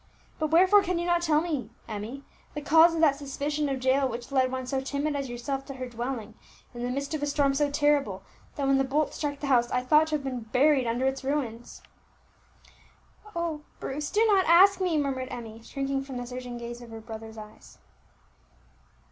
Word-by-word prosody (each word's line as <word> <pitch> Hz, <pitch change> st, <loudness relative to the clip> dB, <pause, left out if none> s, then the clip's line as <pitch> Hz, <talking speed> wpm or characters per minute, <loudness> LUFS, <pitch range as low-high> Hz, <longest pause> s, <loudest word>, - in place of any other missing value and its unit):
But 310 Hz, -, +1 dB
wherefore 370 Hz, +6 st, +6 dB
can 365 Hz, -2 st, -1 dB
you 345 Hz, -, -2 dB
not 345 Hz, -1 st, +2 dB
tell 310 Hz, -3 st, +3 dB
me, 315 Hz, -6 st, -3 dB, 0.2 s
Emmie, 220 Hz, +6 st, -6 dB, 0.3 s
the 295 Hz, -, -3 dB
cause 325 Hz, +3 st, +6 dB
of 325 Hz, -, -1 dB
that 290 Hz, -4 st, +4 dB
suspicion 290 Hz, +1 st, -2 dB
of 265 Hz, -2 st, -3 dB
Jael 265 Hz, +1 st, +3 dB
which 240 Hz, +2 st, -7 dB
led 260 Hz, -2 st, +2 dB
one 260 Hz, 0 st, -3 dB
so 265 Hz, +1 st, -1 dB
timid 285 Hz, +2 st, -2 dB
as 275 Hz, -2 st, -3 dB
yourself 270 Hz, +3 st, -4 dB
to 275 Hz, -, -8 dB
her 255 Hz, -1 st, -5 dB
dwelling 235 Hz, -2 st, -5 dB, 0.4 s
in 240 Hz, -, -7 dB
the 245 Hz, -, -2 dB
midst 280 Hz, +4 st, -3 dB
of 310 Hz, -, -2 dB
a 290 Hz, -, 0 dB
storm 285 Hz, -1 st, +2 dB
so 290 Hz, +1 st, +1 dB
terrible, 285 Hz, -9 st, +1 dB, 0.3 s
that 280 Hz, -, -2 dB
when 270 Hz, 0 st, +3 dB
the -, -, +3 dB
bolt 285 Hz, +3 st, 0 dB
struck 285 Hz, -2 st, -3 dB
the 290 Hz, -, -4 dB
house 245 Hz, -3 st, +3 dB
I 250 Hz, -, 0 dB
thought 305 Hz, +4 st, +4 dB
to 310 Hz, -, -1 dB
have 290 Hz, -, -3 dB
been 260 Hz, -2 st, -3 dB
buried 255 Hz, +3 st, +2 dB
under 240 Hz, +3 st, 0 dB
its 265 Hz, 0 st, -1 dB
ruins?" 255 Hz, -4 st, -3 dB, 1.5 s
"Oh! 335 Hz, -3 st, -2 dB, 0.2 s
Bruce, 295 Hz, +2 st, -4 dB
do 435 Hz, +2 st, +3 dB
not 395 Hz, -4 st, +4 dB
ask 385 Hz, +3 st, +7 dB
me!" 355 Hz, -4 st, +1 dB
murmured 270 Hz, -3 st, -1 dB
Emmie, 225 Hz, -3 st, -8 dB
shrinking 275 Hz, +3 st, -3 dB
from 270 Hz, -2 st, -7 dB
the 245 Hz, -, -4 dB
searching 250 Hz, 0 st, -6 dB
gaze 240 Hz, 0 st, -7 dB
of 240 Hz, -, -11 dB
her 225 Hz, 0 st, -8 dB
brother's 220 Hz, 0 st, -9 dB
eyes. 215 Hz, 0 st, -12 dB
275 Hz, 205 wpm, -27 LUFS, 245-300 Hz, 1.5 s, ask